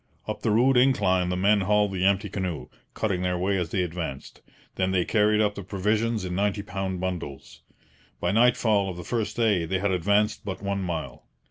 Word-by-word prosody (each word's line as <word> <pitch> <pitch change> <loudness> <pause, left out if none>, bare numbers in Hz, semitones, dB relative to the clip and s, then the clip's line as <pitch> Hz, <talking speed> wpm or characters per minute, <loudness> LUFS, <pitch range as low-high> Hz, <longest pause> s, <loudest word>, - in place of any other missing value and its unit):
Up - - -4
the - - 0
rude 125 +5 +4
incline 95 -9 +3
the 90 - -1
men 100 +2 +3
hauled 105 +1 +2
the 95 -1 -2
empty 100 +1 +1
canoe, 90 -5 -4 0.3
cutting 100 -5 -1
their 90 -1 0
way 95 +3 0
as 85 -3 -2
they 95 +1 0
advanced. 80 -6 -6 0.3
Then 95 0 0
they 95 -2 +1
carried 105 0 +3
up 105 -1 +1
the 100 - -7
provisions 105 +2 -1
in 90 - -4
ninety 100 +2 0
pound 95 -2 -4
bundles. 90 -7 -6 0.6
By 90 - 0
nightfall 110 -3 +3
of 90 - -6
the 90 - -7
first 115 +3 -2
day 105 -7 +2
they 95 - 0
had 100 +1 0
advanced 100 +4 +1
but 95 -2 -5
one 100 0 -2
mile. 85 -3 -5
95 Hz, 200 wpm, -26 LUFS, 90-105 Hz, 0.6 s, rude